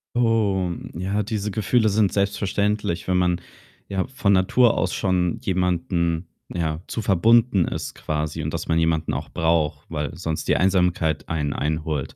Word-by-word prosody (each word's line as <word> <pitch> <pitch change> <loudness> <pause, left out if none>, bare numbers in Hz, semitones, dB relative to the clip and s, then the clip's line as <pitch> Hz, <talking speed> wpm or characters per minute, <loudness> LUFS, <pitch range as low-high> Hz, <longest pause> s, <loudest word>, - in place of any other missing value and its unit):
Oh, 105 -6 +2 0.2
ja, 95 +5 -1
diese 105 -1 -3
Gefühle 110 +2 +2
sind 100 -1 +2
selbstverständlich, 100 -2 -1
wenn 90 0 +2
man, 90 -1 +1 0.5
ja, 95 +3 -1
von 130 -7 +1
Natur 115 +6 +4
aus 95 - 0
schon 90 -2 0
jemanden, 85 -2 0 0.2
ja, 80 -2 -2
zu 115 - -4
verbunden 110 +1 +4
ist - - -4
quasi 75 +1 -3
und 75 +1 -3
dass 85 0 -4
man 80 0 +2
jemanden 80 -1 +1
auch - - -4
braucht, 80 -3 0
weil 75 -1 -3
sonst 80 -3 -3
die - - +3
Einsamkeit 90 -4 +1
einen 75 -3 -1
einholt. 75 -2 -2
90 Hz, 155 wpm, -23 LUFS, 80-100 Hz, 0.5 s, Natur